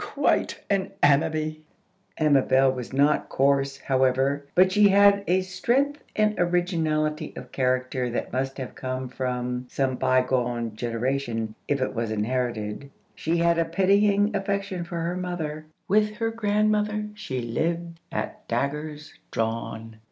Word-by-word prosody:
Quite - - 0
an 195 -1 0
Ammaby!" 155 +2 +2 0.6
Amabel 135 -3 +4
was 125 -2 -6
not 140 +3 +2
coarse, 135 0 +2
however; 135 +2 +1
but 185 +1 +5
she 205 +2 +6
had 200 0 +5
a 185 +2 +3
strength 245 +10 0
and 215 0 +3
originality 165 -4 0
of - - -9
character 130 -1 0
that 120 - -4
must 135 +1 -2
have 130 -2 -6
come 130 0 -4
from 125 0 -3
some 130 -1 -1
bygone 125 -3 +1
generation, 115 -1 -2
if 140 - +1
it 130 - -1
was 115 -2 -2
inherited. 110 +2 -2 0.2
She 165 +2 -1
had 170 0 +3
a 165 - +2
pitying 200 +4 +3
affection 195 -2 -2
for 170 0 -5
her 170 +2 -2
mother. 160 -4 -4 0.2
With 210 +2 +2
her 225 0 -1
grandmother 210 -1 +1
she 190 -12 -5
lived 165 +8 -2
at - - -5
daggers 150 +2 -3 0.2
drawn. 115 0 -3
150 Hz, 135 wpm, -25 LUFS, 130-185 Hz, 0.6 s, she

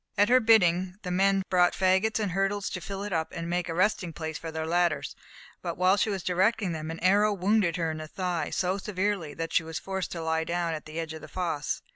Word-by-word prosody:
At 205 +3 +4
her 255 +1 +6
bidding 185 -6 +4
the 180 - -4
men 195 +1 +3
brought 180 -1 +4
faggots 190 +4 +2
and 205 -4 -1
hurdles 195 +2 -1
to 185 - -4
fill 195 +3 -5
it 205 -2 -4
up 160 -1 -1
and 165 -1 -4
make 175 0 -1
a - - -2
resting 185 -2 +1
place 160 0 -5
for 165 +1 -6
their 160 0 -3
ladders, 165 -4 0 0.5
but - - -4
while 185 +2 +4
she 215 - +1
was 195 -3 -3
directing 190 +2 +1
them, 155 -1 -5
an 165 - -5
arrow 205 +4 +4
wounded 195 -2 +2
her 165 -2 -1
in 155 - -5
the 155 - -6
thigh 175 -2 -2
so 185 +2 -1
severely 195 -6 -2
that 165 0 -4
she - - +4
was 160 -1 -6
forced 190 -1 -4
to 165 -2 -5
lie 160 0 0
down 170 0 -1
at 155 - -6
the 155 +1 -6
edge 160 -1 -4
of 160 - -8
the 155 - -9
fosse. 165 -2 -3
180 Hz, 245 wpm, -28 LUFS, 165-195 Hz, 0.5 s, her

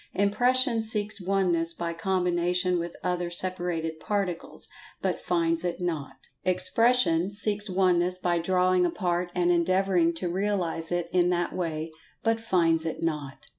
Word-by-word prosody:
Impression 245 +4 +2
seeks 215 -1 0
Oneness 180 -3 0
by 170 -1 -3
combination 180 0 0
with 170 0 -5
other 180 -1 -1
separated 175 -3 -1
Particles, 195 -4 -4 0.3
but - - -2
finds 165 -1 0
it 175 0 -3
not. 165 -6 -4 0.3
Expression 185 0 +3
seeks 205 0 +1
Oneness 180 -1 +2
by[Pg 175 -1 -1
152] - - 0
drawing 185 0 +3
apart 175 0 -2
and 175 -1 +2
endeavoring 180 0 +2
to 175 +2 -3
realize 175 -3 -2
it 175 -1 -1
in 180 -1 +3
that 175 -1 -1
way, 160 -2 -3 0.3
but 225 0 +1
finds 165 -6 +2
it 165 0 -4
not. 150 -4 -4
180 Hz, 140 wpm, -27 LUFS, 170-190 Hz, 0.3 s, Expression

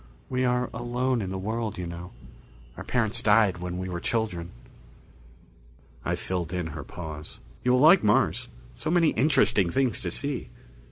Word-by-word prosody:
We 130 0 0
are 125 0 +1
alone 120 +1 -1
in 95 - -3
the 95 - -3
world, 110 +2 -3
you 90 - -4
know 85 +1 -7 0.6
our - - -7
parents 115 -2 0
died 105 -4 +4
when 90 0 -4
we 95 0 -3
were 90 -1 -3
children." 90 -5 -2 1.5
I - - 0
filled 90 -3 -3
in 90 -2 -1
her 75 -2 -6
pause. 75 -2 -8 0.2
"You 125 - +3
will 125 - +4
like 170 +5 +7
Mars. 105 0 +2 0.3
So - - -4
many 170 -1 +4
interesting 110 - +3
things 130 +3 +1
to 90 - -2
see." 140 +8 -2
110 Hz, 165 wpm, -27 LUFS, 90-125 Hz, 1.5 s, like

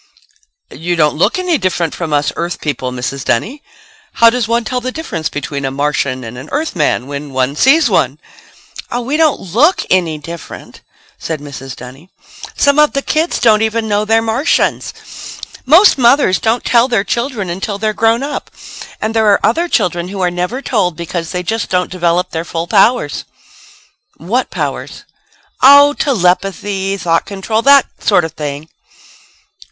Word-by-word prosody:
"You 175 +2 -2
don't 150 -3 +2
look 200 - +1
any 365 -3 0
different 175 -4 -1
from 165 -3 -5
us 145 0 0
Earth 175 +1 -3
people, 135 -4 -3
Mrs. 125 +2 -4
Dunny. 240 - -1 0.5
How 230 0 +5
does 245 -2 -1
one 235 +1 0
tell 250 +2 -3
the 255 +1 -3
difference 175 - -4
between 140 -1 -5
a 135 - -1
Martian 140 -2 -2
and 120 +2 -8
an 135 - -11
Earthman 195 - -1
when 140 0 -7
one 130 +2 0
sees 280 - +4
one?" 145 - +1 0.7
"Oh, 245 - -2
we 265 +5 -2
don't 315 -2 +2
look 240 - +1
any 170 -4 +1
different," 165 +2 -10 0.4
said 160 -2 -4
Mrs. 135 -2 -9
Dunny. 130 +8 -12 0.5
"Some 285 +1 +3
of 300 0 +4
the 275 - -1
kids 320 +3 0
don't 220 -2 +4
even 220 0 -1
know 205 0 +1
they're 225 +1 +2
Martians. 230 +7 0 0.8
Most 335 +2 +6
mothers 240 -5 +4
don't 230 +2 0
tell 235 0 +4
their 230 -6 +1
children 235 -6 -3
until 195 +3 -4
they're 215 +1 -1
grown 225 +4 +1
up. 290 +1 -5 0.5
And 220 +1 -2
there 220 -1 +2
are 205 - +4
other 330 +10 +1
children 180 - 0
who 195 +1 -7
are 180 -1 +1
never 180 +10 -3
told 185 -8 0
because 170 -1 -4
they 180 0 -3
just 225 +4 -2
don't 180 -1 0
develop 180 0 0
their 165 0 -3
full 165 -1 -4
powers." 200 - +2 0.9
"What 225 +11 -2
powers?" - - -5 0.6
"Oh, 285 +2 +7
telepathy, 195 - 0
thought 165 -3 0
control 205 +3 -2
that 280 +1 +6
sort 180 -6 +2
of 160 - -6
thing." 145 0 -6
195 Hz, 165 wpm, -14 LUFS, 160-240 Hz, 0.9 s, Oh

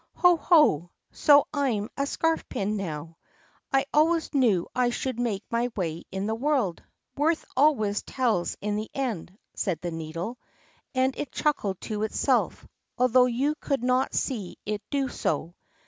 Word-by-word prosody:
"Ho, 355 -1 +5
ho! 300 - +4 0.2
So 290 -1 +5
I'm 250 -8 0
a 280 0 -1
scarf 325 +2 0
pin 205 +2 -1
now! 165 -4 -5 0.5
I 270 0 +3
always 320 +2 +3
knew 230 -11 +3
I 250 -1 +2
should 240 0 -3
make 215 -5 -1
my 235 +1 +1
way 170 -4 -3
in 190 +1 -3
the 220 - 0
world. 245 - 0 0.3
Worth 315 +3 +1
always 250 -8 +3
tells 230 -9 -1
in 210 0 -1
the 215 +1 -4
end," 215 -9 -3 0.2
said 180 -6 -1
the 175 - -3
Needle. 165 +8 -5 0.6
And 260 +1 +2
it 285 - -5
chuckled 210 -11 0
to 210 -2 -4
itself, 215 - 0 0.3
although 250 0 +5
you 265 +5 +1
could 275 -5 -1
not 255 +1 +1
see 215 -10 -2
it 210 0 -2
do 280 -2 0
so. 165 - -2
240 Hz, 155 wpm, -27 LUFS, 195-275 Hz, 0.6 s, Ho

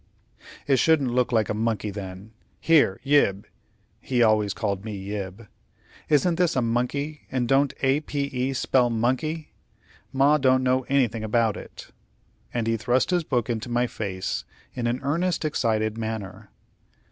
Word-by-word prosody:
"It 135 -2 +3
shouldn't 145 -6 +3
look 125 0 +1
like 110 -3 +2
a - - -1
monkey, 110 -1 -1
then. 95 +1 -8 0.3
Here, 150 -12 +3
Yib" 120 -9 +3 0.5
he 125 -2 +1
always 110 -2 +3
called 100 -1 -2
me 105 -2 -5
Yib 100 +2 -6 0.6
"isn't 160 +3 +3
this 180 -2 +2
a 130 - +2
monkey, 135 +6 -2
and 125 -2 0
don't 135 +1 +3
A 135 +2 +3
p 145 -2 -4
e 135 -1 -2
spell 125 -1 +2
monkey? 130 +7 -1 0.6
Ma 140 +3 +4
don't 130 -1 +3
know 130 0 +1
anything 120 -5 +1
about 110 0 +1
it;" - - -11 0.6
and 120 -2 -2
he 115 0 +1
thrust 125 - +1
his 175 -2 +2
book 125 -7 -1
into 115 0 -3
my 120 +1 +1
face 95 -5 -4 0.3
in 120 -2 -2
an 120 +2 -1
earnest, 170 +5 0
excited 110 -6 0
manner. 110 -3 -5
120 Hz, 155 wpm, -25 LUFS, 110-140 Hz, 0.6 s, Ma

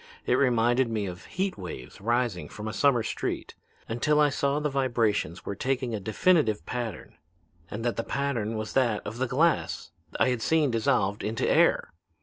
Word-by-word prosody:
It - - +2
reminded 120 -1 +3
me 110 -3 -1
of 90 0 -7
heat 190 - -3
waves 85 -8 -8
rising 120 -4 0
from 105 +1 -7
a 110 - -4
summer 125 -3 +3
street, - - -3 0.3
until 150 +7 +1
I 150 -1 +5
saw 140 +1 0
the 150 - 0
vibrations 115 - 0
were - - -3
taking 125 +2 -1
a 110 - -2
definite 110 - +2
pattern; 120 -8 -5 0.5
and 115 +3 -5
that 120 - 0
the 115 - -1
pattern 120 -6 -2
was 110 0 -4
that 120 -5 +1
of 110 +4 -6
the 130 - +1
glass 155 +8 +1 0.3
I - - +4
had 125 -2 -1
seen 155 0 +2
dissolved 105 -3 +1
into 110 +1 -1
air. - - +3
120 Hz, 175 wpm, -27 LUFS, 110-135 Hz, 0.5 s, I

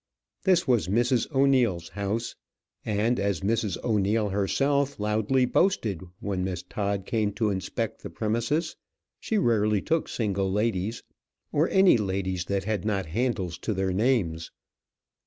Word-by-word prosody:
This 180 -4 +3
was 120 -8 +2
Mrs. 120 +6 +1
O'Neil's 130 - +2
house; 105 +3 -3 0.5
and, 110 +4 0
as 100 -4 0
Mrs. 105 -2 0
O'Neil 105 -1 +1
herself 135 +8 0
loudly 110 +5 +1
boasted 120 - +1 0.2
when 95 -2 -2
Miss 90 -2 -3
Todd 100 0 -3
came 110 -2 0
to 110 -1 0
inspect 95 -2 -3
the - - -7
premises, 120 +9 -1 0.4
she 220 - -1
rarely 110 - +2
took 165 - -1
single 100 -4 -1
ladies, 105 +1 -1 0.5
or 155 +4 +2
any 190 -7 +5
ladies 95 -3 -2
that 100 0 -1
had 105 -3 -2
not 100 -3 -1
handles 95 -3 -2
to 110 +3 -2
their 95 0 0
names. 95 -7 0
105 Hz, 140 wpm, -27 LUFS, 95-120 Hz, 0.5 s, any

